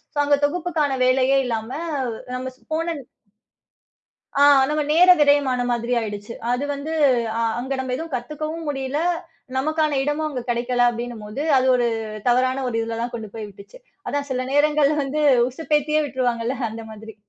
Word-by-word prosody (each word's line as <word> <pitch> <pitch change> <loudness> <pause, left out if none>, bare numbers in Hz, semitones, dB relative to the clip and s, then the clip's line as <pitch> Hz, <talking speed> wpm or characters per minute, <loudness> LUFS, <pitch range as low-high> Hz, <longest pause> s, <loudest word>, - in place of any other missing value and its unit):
So - - -4
அங்க 285 0 +4
தொகுப்புக்கான 305 -4 -1
வேலையே 265 +1 +3
இல்லாம 225 -2 -3 0.7
நம்ம 255 +1 -4
ஸ்ப்போன 330 +3 -3 1.4
ஆ, - - +7 0.3
நம்ம 300 0 0
நேர 360 +3 +6
விரயமான 285 -3 +3
மாதிரி 240 +1 -1
ஆயிடுச்சு. 210 0 -6 0.2
அது 250 +3 -1
வந்து 285 +3 -5 0.4
அ - - -1 0.2
அங்க 265 +2 -6
நம்ப 260 -1 -3
எதுவும் 325 +1 -7
கத்துக்கவும் 305 +6 -4
முடியல. 270 0 -2 0.6
நமக்கான 305 0 +1
இடமும் 295 +2 -1
அங்க 260 -4 -4
கிடைக்கல 245 +1 +1
அப்டின்னு 240 0 -5
போது 210 +8 -5
அது 260 - +3
ஒரு 240 - +1 0.4
தவறான 255 +2 +2
ஒரு 240 - -5
இதுல 225 0 -3
தான் 240 - -3
கொண்டு 220 -2 -5
போய் 220 -2 -5
விட்டுச்சு. 200 - -14 0.3
அதான் 285 0 -2
சில 255 0 -1
நேரங்கள்ல 295 0 +3
வந்து 285 +3 -2 0.3
உசுப்பேத்தியே 300 +2 0
விட்டுருவாங்கல்ல 245 -1 -1
அந்த 225 0 -8
மாதிரி. 220 0 -10
265 Hz, 155 wpm, -22 LUFS, 240-300 Hz, 1.4 s, ஆ